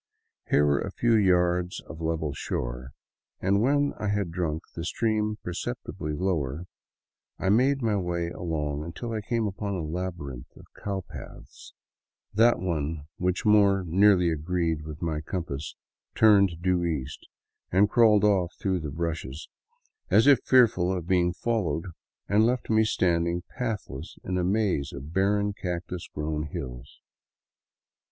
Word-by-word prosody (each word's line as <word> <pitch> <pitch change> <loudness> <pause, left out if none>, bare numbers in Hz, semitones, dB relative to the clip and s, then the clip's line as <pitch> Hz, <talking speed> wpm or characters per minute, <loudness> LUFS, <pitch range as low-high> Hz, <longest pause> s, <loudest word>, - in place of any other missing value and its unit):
Here 75 - +4
were 70 -1 +3
a - - -3
few 120 +3 +1
yards 90 -3 +2
of 80 +3 -11
level 80 -2 -1
shore, 65 -1 -4 0.5
and 100 +2 +2
when 145 +3 +2
I 105 - -2
had 100 -4 -1
drunk 85 -2 -2
the 85 - -5
stream 110 +2 0
perceptibly 90 -4 -4
lower, 80 -3 -1 0.7
I 95 - -1
made 130 +5 +3
my 110 -2 +2
way 85 -2 -2
along 75 -4 -3
until 100 +9 -6
I 110 - -2
came 115 +1 -1
upon 100 0 -3
a 90 - -3
labyrinth 80 -6 -5
of - - -14
cow 100 -2 -4
paths. - - -11 0.6
That 115 +3 +5
one 80 -4 -2 0.2
which 90 +3 -1
most 100 -4 +4
nearly 90 -1 +5
agreed 80 -1 -1
with 75 +2 -7
my 80 -2 -1
compass 80 -4 -5 0.4
turned 100 -6 +4
due 90 -1 +2
east 75 -5 -3 0.4
and 95 +3 +5
crawled 105 -1 +5
off 95 -4 +2
through 95 -2 0
the 75 -2 -5
bushes, 80 -2 -4 0.6
as 110 - +5
if 140 -3 +7
fearful 110 -8 +4
of 90 -3 -3
being 90 -1 +2
fol 115 +2 -1
lowed, 80 - -5 0.4
and 105 +2 +4
left 120 0 0
me 110 0 +4
standing 85 -3 +1
pathless 105 - -4
in 90 0 -1
a - - 0
maze 95 -7 0
of 70 +3 -8
barren, 100 +2 +2
cactus 90 -2 -5
grown 75 0 -3
hills. 65 -6 -8
90 Hz, 145 wpm, -27 LUFS, 80-105 Hz, 0.7 s, if